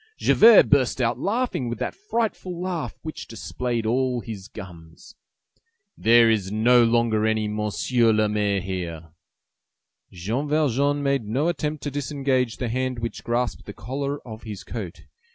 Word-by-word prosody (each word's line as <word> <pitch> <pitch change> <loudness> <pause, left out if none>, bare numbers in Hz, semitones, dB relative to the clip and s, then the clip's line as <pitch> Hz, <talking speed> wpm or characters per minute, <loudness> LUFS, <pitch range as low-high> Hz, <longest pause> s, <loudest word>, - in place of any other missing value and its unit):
Javert 230 -1 +7
burst 135 -3 +3
out 120 -1 0
laughing 210 - -1
with 120 - -4
that - - -3
frightful 225 - -3
laugh 180 -3 -4
which 155 -1 -7
displayed 120 0 -3
all 125 +2 +1
his 105 -4 -8
gums. 90 - -12 0.8
"There 115 +1 +5
is 105 -4 +1
no 120 +3 +5
longer 115 -2 +2
any 110 -1 0
Monsieur 105 +3 +1
le 110 0 +2
Maire 105 -2 0
here!" 85 -4 -6 1.0
Jean 110 - -3
Valjean 145 -1 +1
made 140 -4 0
no 135 +10 0
attempt 150 -4 -3
to 145 - -3
disengage 135 -3 -1
the 125 - -3
hand 130 +1 -2
which 115 0 -5
grasped 120 +1 -2
the 105 - -7
collar 140 +7 -4
of 110 0 -8
his 105 -4 -8
coat. 100 -8 -7
120 Hz, 150 wpm, -24 LUFS, 110-140 Hz, 1.0 s, Javert